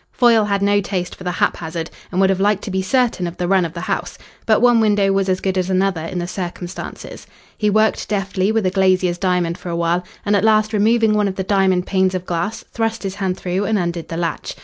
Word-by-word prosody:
Foyle 230 -4 +4
had 200 -1 0
no 205 0 +3
taste 185 -2 -3
for - - -11
the 180 -1 -2
haphazard, 165 -2 -2 0.2
and 185 - -1
would 195 0 +4
have 190 - -1
liked 205 0 +1
to 200 - -5
be 190 0 0
certain 225 -3 +1
of 170 - -7
the 175 - -2
run 190 -1 +3
of 165 - -6
the 170 - -6
house. - - -3 0.3
But 220 - +4
one 240 0 +5
window 205 -3 +3
was 195 0 +1
as 185 0 +1
good 190 -1 -1
as 185 0 -2
another 190 -2 +1
in 165 +3 -5
the 175 - -2
circumstances. 180 0 -7 0.3
He 210 - +1
worked 215 +1 +1
deftly 195 -1 0
with 220 -2 0
a 185 - +2
glazier's 185 -2 +2
diamond 180 -2 0
for 180 - -7
a 170 - -2
while, 170 +1 0 0.2
and 205 0 +2
at 200 - +2
last 215 0 +3
removing 220 +1 +3
one 210 -1 +2
of 190 - -3
the 190 - -2
diamond 190 -2 +2
panes 190 -1 +1
of 180 0 -4
glass 175 +6 -3
thrust 225 -1 -2
his 195 -1 -3
hand 190 -2 -2
through 185 +2 -2
and 215 +1 +1
undid 170 -2 -3
the 165 - -5
latch. 170 -1 -3
190 Hz, 245 wpm, -19 LUFS, 180-205 Hz, 0.3 s, one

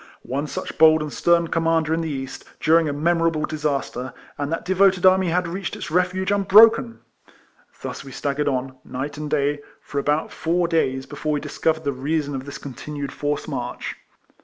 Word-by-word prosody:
One 140 +4 -3
such - - -6
bold 155 -1 +6
and 150 - -6
stern 170 -1 +2
commander 165 -1 +1
in 165 - 0
the 165 - -3
East, 135 -2 -5 0.2
during 160 0 +4
a - - 0
memorable 165 +1 +1
disaster, 140 -4 -3 0.2
and 145 +1 -3
that 165 - -3
devoted 190 0 +3
army 185 0 +5
had 180 +1 +1
reached 180 +2 -4
its - - -7
refuge 185 +2 +1
unbroken! 215 +4 +5 0.8
Thus - - -5
we 135 - -10
staggered 145 +2 -2
on, 130 -1 -2
night 140 +3 -5
and 150 -1 -4
day, 145 -1 +1 0.2
for 140 - -4
about 150 +2 0
four 170 +1 0
days, 135 -6 0
before 150 +1 -3
we 145 - 0
discovered 160 +2 -1
the 140 - 0
reason 145 +2 -2
of 135 -1 -5
this 145 - -7
continued 140 +1 -6
forced 145 0 -2
march. - - -4
155 Hz, 180 wpm, -23 LUFS, 145-170 Hz, 0.8 s, bold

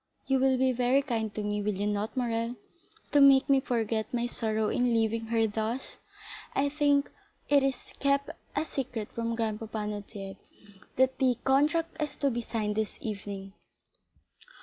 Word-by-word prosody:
You 270 -1 +2
will 260 0 +3
be 260 0 +3
very 250 +3 +2
kind 225 -5 -1
to 215 - -2
me, 205 0 -1
will 205 0 -1
you 200 +2 -2
not, 210 +4 -2
Morrel, 230 -1 -1 0.6
to 290 - +5
make 275 -1 +7
me 275 -1 +5
forget 225 -3 -1
my 240 -1 0
sorrow 220 -2 -1
in 245 -1 +2
leaving 225 0 0
her 225 0 +2
thus? 220 +4 -3 0.6
I 285 +1 +2
think 285 -1 +2 0.4
it 285 -1 +6
is 270 -2 -1 0.2
kept 280 0 +1 0.2
a - - 0
secret 240 -8 -4
from 230 0 -2
grandpapa 220 -1 -3
Noirtier, 200 -2 -6 0.6
that 260 +1 +2
the 255 -3 +3
contract 305 +5 +2
is 295 -2 -2
to 280 -2 +1
be 240 0 -2
signed 215 -2 -2
this 220 -1 -2
evening." 200 -2 -6
235 Hz, 165 wpm, -29 LUFS, 215-270 Hz, 0.6 s, make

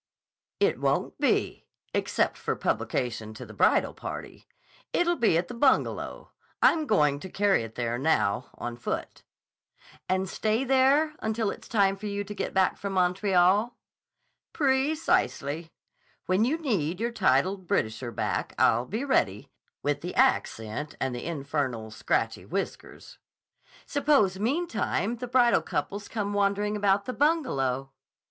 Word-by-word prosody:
"It - - +2
won't - - 0
be, - - 0 0.3
except - - 0
for - - -2
publication 115 -3 -2
to - - -8
the - - -12
bridal - - +3
party. - - -8 0.5
It'll 345 0 +2
be 225 - +3
at 175 +1 -1
the - - -7
Bungalow. 260 +2 0 0.3
I'm 315 -2 +4
going 150 - +3
to 190 - -8
carry 200 -2 +2
it 115 -1 -8
there 120 0 -2
now, 130 -6 +1
on 120 0 -5
foot." 120 - -4 0.9
"And 190 +1 +1
stay 220 +6 0
there 270 +4 +3
until 220 -1 -1
it's - - -10
time 200 -4 +2
for 210 - -6
you 205 0 -2
to 210 - -7
get - - -3
back 190 -1 +2
from 200 -1 -4
Montreal?" 190 +4 +2 0.8
"Precisely. 265 - 0 0.5
When 185 +4 +2
you 290 +6 +1
need 190 - -1
your 235 +1 -1
titled 190 - +1
Britisher 115 0 -1
back, - - -2
I'll 120 +2 +3
be 225 +8 -3
ready, 130 - 0 0.3
with 145 0 0
the 175 - -5
accent 145 - 0
and 130 -1 -1
the 120 - -5
infernal, 140 -8 -3
scratchy 110 +1 -1
whiskers." 195 - -6 0.7
"Suppose, 280 -10 +2
meantime, 235 - -1
the 250 +2 -5
bridal 240 -3 +4
couples 200 +1 -3
come 205 -2 -3
wandering 205 +1 +1
about 200 -1 +2
the 255 - -3
Bungalow?" 135 - 0
195 Hz, 140 wpm, -27 LUFS, -, 0.9 s, I'm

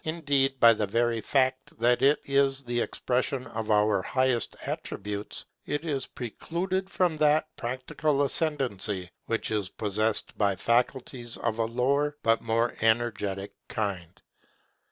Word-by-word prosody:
Indeed 140 -4 +1
by 115 -1 +8
the 105 -2 -1
very 115 +2 +1
fact 130 0 0
that 120 +2 +3
it 140 +2 +4
is 140 0 +2
the 120 -1 -1
expression 130 +1 -1
of 110 0 -5
our 105 -2 +3
highest 130 +2 0
attributes, 105 +1 -4 0.2
it 145 +3 -2
is 140 -4 -2
precluded 180 - -3
from 180 -5 +1
that 155 +1 +2
practical 135 +4 -1
ascendancy 115 - -1 0.2
which 115 -1 -1
is 105 -3 -1
possessed 105 +1 -1
by 100 -2 +3
faculties 120 +3 -1
of 110 - -2
a 115 - +2
lower 140 +5 +1
but 115 0 +3
more 115 +1 0
energetic 105 -4 +1 0.2
kind. 95 -5 -3
120 Hz, 135 wpm, -28 LUFS, 110-140 Hz, 0.2 s, by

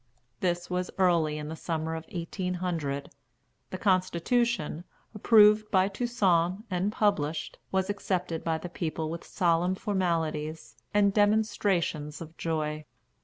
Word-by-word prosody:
This 175 -1 -1
was 180 0 -2
early 170 -5 +3
in 150 0 -5
the 160 - -5
summer 160 -1 -3
of 160 0 -5
1800. 170 -5 -3 0.6
The 185 - -5
constitution, 185 0 +1 0.3
approved 210 0 +5
by 190 0 +3
Toussaint 195 -4 +1
and 185 +3 0
published, 165 -8 0
was 190 0 +1
accepted 180 -4 -2
by 165 -1 0
the 160 - -6
people 160 -2 -3
with 170 - -6
solemn 175 0 +1
formalities 165 -6 -2 0.2
and 205 -1 +3
demonstrations 205 -8 +1
of 165 0 -9
joy. 155 -2 -2
175 Hz, 120 wpm, -28 LUFS, 160-200 Hz, 0.6 s, approved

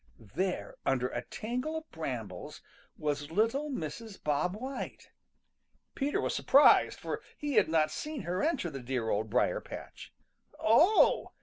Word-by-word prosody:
There, 185 0 -2
under 125 -2 +1
a 120 - -3
tangle 250 - -4
of 320 0 -9
brambles, 115 - -6 0.3
was 145 -1 -2
little 230 - +1
Mrs. 205 - -5
Bob 150 +5 0
White. 260 +5 -6 0.8
Peter 285 +1 0
was - - -1
surprised, 280 +2 +5
for - - -4 0.2
he 295 -1 -3
had 210 -8 +4
not 155 -1 +2
seen 300 - -5
her 180 +2 -2
enter 290 - 0
the 135 - -6
dear 120 -2 -2
Old 110 +1 0
Briar - - +1
patch. - - -9 0.5
"Oh!" 325 - +4
180 Hz, 140 wpm, -31 LUFS, -, 0.8 s, surprised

